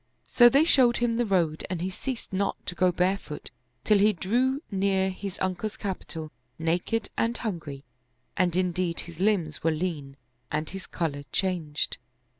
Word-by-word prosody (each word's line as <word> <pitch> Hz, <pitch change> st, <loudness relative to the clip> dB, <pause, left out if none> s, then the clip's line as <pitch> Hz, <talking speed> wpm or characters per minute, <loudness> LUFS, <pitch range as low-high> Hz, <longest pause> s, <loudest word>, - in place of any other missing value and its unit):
So 240 Hz, -1 st, +7 dB
they 275 Hz, +5 st, +5 dB
showed 255 Hz, -7 st, +5 dB
him 235 Hz, -1 st, +1 dB
the 240 Hz, -1 st, +1 dB
road 170 Hz, -5 st, +1 dB
and 180 Hz, -2 st, -2 dB
he 185 Hz, +2 st, -2 dB
ceased 245 Hz, +2 st, -5 dB
not 195 Hz, +1 st, +1 dB
to -, -, -2 dB
go 180 Hz, +1 st, +3 dB
barefoot, 180 Hz, -3 st, -1 dB, 0.3 s
till 210 Hz, -2 st, +4 dB
he 210 Hz, +2 st, +5 dB
drew 255 Hz, -, +1 dB
near 190 Hz, -1 st, +2 dB
his 190 Hz, 0 st, -6 dB
uncle's 190 Hz, +3 st, -2 dB
capital, 165 Hz, -5 st, -5 dB, 0.3 s
naked, 175 Hz, +8 st, -1 dB
and 230 Hz, +1 st, +1 dB
hungry, 155 Hz, -, -5 dB, 0.5 s
and 175 Hz, -1 st, +2 dB
indeed 180 Hz, -2 st, 0 dB
his 170 Hz, -1 st, -11 dB
limbs 185 Hz, -7 st, +1 dB
were 165 Hz, -, +4 dB
lean 155 Hz, -4 st, -3 dB, 0.3 s
and 155 Hz, +1 st, -1 dB
his 190 Hz, -3 st, -7 dB
color 155 Hz, -5 st, -2 dB
changed. 170 Hz, -6 st, -1 dB
185 Hz, 160 wpm, -27 LUFS, 165-210 Hz, 0.5 s, So